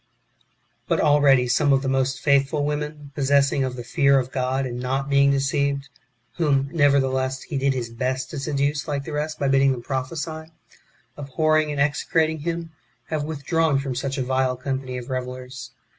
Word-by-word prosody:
4. -, -, +2 dB
But -, -, +1 dB
already 140 Hz, -4 st, +5 dB
some 145 Hz, +3 st, +2 dB
of 135 Hz, 0 st, +3 dB
the -, -, -2 dB
most 135 Hz, 0 st, 0 dB
faithful 140 Hz, +1 st, +2 dB
women, 150 Hz, -1 st, -4 dB
possessed 140 Hz, 0 st, +2 dB
of 130 Hz, -2 st, -1 dB
the 120 Hz, -, -6 dB
fear 140 Hz, +3 st, +3 dB
of 130 Hz, -1 st, -1 dB
God, 130 Hz, +1 st, -1 dB
and 125 Hz, -1 st, -5 dB
not 135 Hz, +2 st, -2 dB
being 140 Hz, 0 st, +5 dB
deceived 140 Hz, 0 st, 0 dB, 0.5 s
(whom, 140 Hz, -4 st, +1 dB
never 145 Hz, -3 st, +4 dB
theless, 130 Hz, 0 st, -1 dB
he 150 Hz, -, -7 dB
did 135 Hz, 0 st, +1 dB
his 120 Hz, -2 st, -4 dB
best 130 Hz, +2 st, -2 dB
to 145 Hz, -, -4 dB
seduce 140 Hz, +1 st, -1 dB
like 145 Hz, -2 st, -2 dB
the 155 Hz, -, -7 dB
rest 155 Hz, +1 st, -2 dB
by 140 Hz, -, 0 dB
bidding 135 Hz, 0 st, +4 dB
them 120 Hz, -2 st, -7 dB
prophesy), 155 Hz, +5 st, -4 dB, 0.7 s
abhorring 155 Hz, +2 st, +1 dB
and 145 Hz, -, -3 dB
execrating 155 Hz, +2 st, +1 dB
him, 165 Hz, +1 st, -4 dB, 0.4 s
have 155 Hz, -2 st, -1 dB
with 150 Hz, -2 st, -6 dB
drawn 165 Hz, -3 st, +2 dB
from 135 Hz, -1 st, -2 dB
such 135 Hz, +2 st, -3 dB
a 130 Hz, -, 0 dB
vile 130 Hz, 0 st, 0 dB
company 130 Hz, 0 st, -4 dB
of 125 Hz, +1 st, -7 dB
revellers. 130 Hz, 0 st, -5 dB
140 Hz, 185 wpm, -23 LUFS, 130-150 Hz, 0.7 s, already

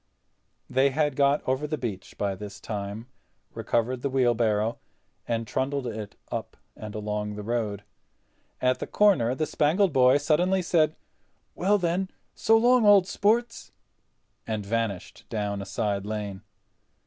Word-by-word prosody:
They 135 Hz, +2 st, +3 dB
had 145 Hz, 0 st, 0 dB
got 140 Hz, +1 st, +2 dB
over 130 Hz, +3 st, 0 dB
the 155 Hz, +1 st, -2 dB
beach 110 Hz, -8 st, -6 dB
by 100 Hz, -1 st, -1 dB
this 100 Hz, +1 st, -8 dB
time, 105 Hz, +1 st, -5 dB, 0.5 s
recovered 120 Hz, +2 st, -1 dB
the 140 Hz, -, -1 dB
wheelbarrow, 115 Hz, -4 st, +1 dB, 0.5 s
and 115 Hz, -1 st, -1 dB
trundled 135 Hz, +3 st, -2 dB
it 110 Hz, -3 st, -6 dB, 0.2 s
up -, -, -5 dB, 0.2 s
and 105 Hz, -1 st, -8 dB
along 105 Hz, 0 st, -3 dB
the 105 Hz, -, -6 dB
road. 105 Hz, -3 st, -2 dB, 0.8 s
At 125 Hz, 0 st, +2 dB
the -, -, -4 dB
corner 180 Hz, -, +3 dB
the 155 Hz, -, 0 dB
Spangled 165 Hz, +5 st, +2 dB
Boy 130 Hz, 0 st, +5 dB
suddenly 180 Hz, +6 st, +2 dB
said: 155 Hz, -3 st, +2 dB, 0.6 s
"Well 200 Hz, +4 st, +2 dB
then, 180 Hz, +1 st, -1 dB, 0.2 s
so 225 Hz, +1 st, +4 dB
long, 245 Hz, +1 st, +4 dB
old 205 Hz, -3 st, +7 dB
sports," 230 Hz, +5 st, 0 dB, 0.8 s
and 110 Hz, -2 st, -3 dB
vanished 110 Hz, -3 st, -3 dB
down 105 Hz, -2 st, -2 dB
a 100 Hz, -, -7 dB
side 100 Hz, 0 st, -1 dB
lane. 105 Hz, -3 st, -4 dB
125 Hz, 140 wpm, -26 LUFS, 105-155 Hz, 0.8 s, old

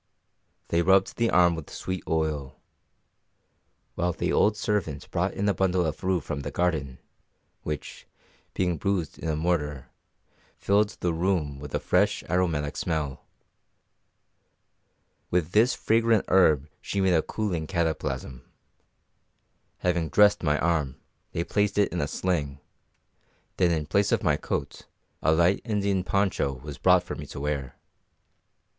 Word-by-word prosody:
They 85 Hz, -, +2 dB
rubbed 95 Hz, +2 st, +3 dB
the 115 Hz, -1 st, +2 dB
arm 85 Hz, -1 st, +5 dB
with 80 Hz, -3 st, -7 dB
sweet 95 Hz, -1 st, -5 dB
oil; 75 Hz, -4 st, -2 dB, 1.3 s
while 85 Hz, 0 st, -1 dB
the -, -, -1 dB
old 105 Hz, 0 st, +3 dB
servant 100 Hz, -10 st, -2 dB
brought -, -, -1 dB
in 100 Hz, -, -1 dB
a 100 Hz, -, +3 dB
bundle 90 Hz, -1 st, +1 dB
of 80 Hz, +3 st, -4 dB
rue 95 Hz, -1 st, +2 dB
from 70 Hz, 0 st, -4 dB
the 70 Hz, -, -4 dB
garden, 80 Hz, -8 st, -1 dB, 0.6 s
which, 75 Hz, -2 st, -6 dB, 0.5 s
being 90 Hz, -3 st, 0 dB
bruised 95 Hz, -6 st, -2 dB
in 80 Hz, -, -3 dB
a 80 Hz, -, 0 dB
mortar, 75 Hz, -5 st, -1 dB, 0.7 s
filled 100 Hz, +1 st, +2 dB
the 85 Hz, -2 st, +1 dB
room 80 Hz, -5 st, -1 dB
with 75 Hz, -1 st, -6 dB
a -, -, +1 dB
fresh, -, -, +1 dB
aromatic 80 Hz, -4 st, 0 dB
smell. 75 Hz, -6 st, -3 dB, 2.0 s
With 85 Hz, -2 st, 0 dB
this 115 Hz, +5 st, +4 dB
fragrant 115 Hz, -1 st, +2 dB
herb 80 Hz, -6 st, +4 dB
she 100 Hz, -, -3 dB
made 95 Hz, -2 st, +3 dB
a 80 Hz, -, +4 dB
cooling 90 Hz, -5 st, -3 dB
cataplasm. 80 Hz, -7 st, -2 dB, 1.4 s
Having 85 Hz, -3 st, 0 dB
dressed 105 Hz, +5 st, +5 dB
my 75 Hz, -2 st, +1 dB
arm, 75 Hz, -6 st, 0 dB, 0.4 s
they 85 Hz, -, -1 dB
placed 105 Hz, +3 st, 0 dB
it 100 Hz, -3 st, +2 dB
in 90 Hz, -, -1 dB
a 70 Hz, -, -1 dB
sling, 75 Hz, -5 st, -2 dB, 1.0 s
then 90 Hz, -2 st, +3 dB
in 80 Hz, -3 st, 0 dB
place 100 Hz, +6 st, +1 dB
of -, -, +1 dB
my -, -, +3 dB
coat -, -, -4 dB, 0.3 s
a 80 Hz, -, +3 dB
light 85 Hz, +4 st, +3 dB
Indian 100 Hz, -4 st, 0 dB
poncho 95 Hz, -8 st, 0 dB
was 70 Hz, +3 st, -9 dB
brought -, -, +5 dB
for -, -, -6 dB
me -, -, -7 dB
to -, -, -8 dB
wear. 70 Hz, -2 st, -3 dB
85 Hz, 145 wpm, -26 LUFS, 75-95 Hz, 2.0 s, arm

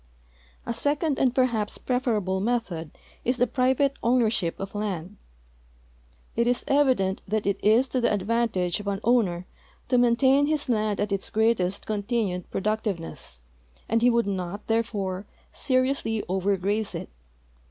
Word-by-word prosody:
A 235 Hz, -, -2 dB
second 290 Hz, +4 st, 0 dB
and 255 Hz, -2 st, +2 dB
perhaps 235 Hz, -6 st, +1 dB
preferable 220 Hz, -7 st, 0 dB
method 200 Hz, -8 st, -1 dB, 0.3 s
is 250 Hz, +1 st, 0 dB
the 245 Hz, -, +4 dB
private 260 Hz, +2 st, +2 dB
owner 235 Hz, -2 st, +3 dB
ship 175 Hz, -7 st, -1 dB
of 195 Hz, 0 st, -5 dB
land. 200 Hz, -3 st, -4 dB, 1.2 s
It 235 Hz, +1 st, +2 dB
is 245 Hz, 0 st, +1 dB
evident 260 Hz, -10 st, +2 dB
that 215 Hz, +1 st, -1 dB
it 200 Hz, 0 st, -1 dB
is 225 Hz, +5 st, +4 dB
to 255 Hz, -, 0 dB
the 235 Hz, -, +2 dB
advantage 205 Hz, -4 st, 0 dB
of 205 Hz, -, -8 dB
an 200 Hz, -1 st, -1 dB
owner 200 Hz, -8 st, +2 dB, 0.4 s
to 250 Hz, -1 st, +4 dB
maintain 260 Hz, +4 st, +4 dB
his 305 Hz, -1 st, 0 dB
land 215 Hz, -3 st, +1 dB
at 205 Hz, 0 st, -1 dB
its 195 Hz, -1 st, -1 dB
greatest 215 Hz, -4 st, +1 dB
continued 205 Hz, -4 st, -2 dB
jiroductive 215 Hz, -1 st, -1 dB
ness, 65 Hz, -, -8 dB, 0.5 s
and 230 Hz, +1 st, +1 dB
he 245 Hz, -, +5 dB
would 235 Hz, -1 st, +2 dB
not, 195 Hz, 0 st, -4 dB
therefore, 205 Hz, -4 st, -1 dB, 0.3 s
seriousl}^ 255 Hz, -4 st, 0 dB
over 190 Hz, +2 st, +1 dB
graze 205 Hz, +3 st, -1 dB
it. -, -, -6 dB
220 Hz, 150 wpm, -26 LUFS, 195-245 Hz, 1.2 s, he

